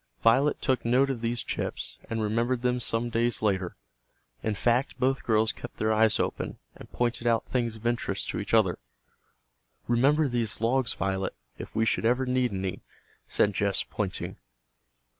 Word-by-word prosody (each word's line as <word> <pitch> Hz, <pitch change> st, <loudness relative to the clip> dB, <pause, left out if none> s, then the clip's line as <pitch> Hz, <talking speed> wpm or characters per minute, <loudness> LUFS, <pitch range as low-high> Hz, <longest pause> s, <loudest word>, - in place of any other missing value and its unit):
Violet 130 Hz, +6 st, +4 dB
took 130 Hz, -2 st, +1 dB
note 130 Hz, +4 st, +3 dB
of 120 Hz, -4 st, -4 dB
these 120 Hz, 0 st, -1 dB
chips, -, -, -4 dB
and 115 Hz, -1 st, -1 dB
remembered 120 Hz, +4 st, 0 dB
them 125 Hz, 0 st, +1 dB
some 120 Hz, 0 st, 0 dB
days 115 Hz, 0 st, +1 dB
later. 95 Hz, -4 st, 0 dB, 0.7 s
In 110 Hz, -, -1 dB
fact, 125 Hz, +4 st, +1 dB
both 135 Hz, +1 st, +1 dB
girls 110 Hz, -1 st, +2 dB
kept -, -, -10 dB
their 110 Hz, 0 st, +1 dB
eyes 110 Hz, 0 st, +3 dB
open, -, -, -2 dB, 0.2 s
and -, -, -13 dB
pointed 120 Hz, 0 st, -1 dB
out 115 Hz, -1 st, +2 dB
things 120 Hz, -3 st, -1 dB
of 110 Hz, +1 st, -13 dB
interest 120 Hz, -4 st, -1 dB
to -, -, -2 dB
each 100 Hz, 0 st, -5 dB
other. 110 Hz, -6 st, +3 dB, 1.1 s
"Remember 140 Hz, +6 st, +3 dB
these 120 Hz, -4 st, -1 dB
logs, 120 Hz, +2 st, +1 dB
Violet, 95 Hz, 0 st, -2 dB, 0.2 s
if -, -, -8 dB
we 110 Hz, 0 st, +2 dB
should -, -, +1 dB
ever 125 Hz, +3 st, +2 dB
need 125 Hz, -1 st, +1 dB
any," 95 Hz, -1 st, -3 dB, 0.5 s
said 105 Hz, -, +2 dB
Jess 100 Hz, 0 st, +1 dB
pointing. -, -, -4 dB
115 Hz, 165 wpm, -28 LUFS, 110-125 Hz, 1.1 s, Violet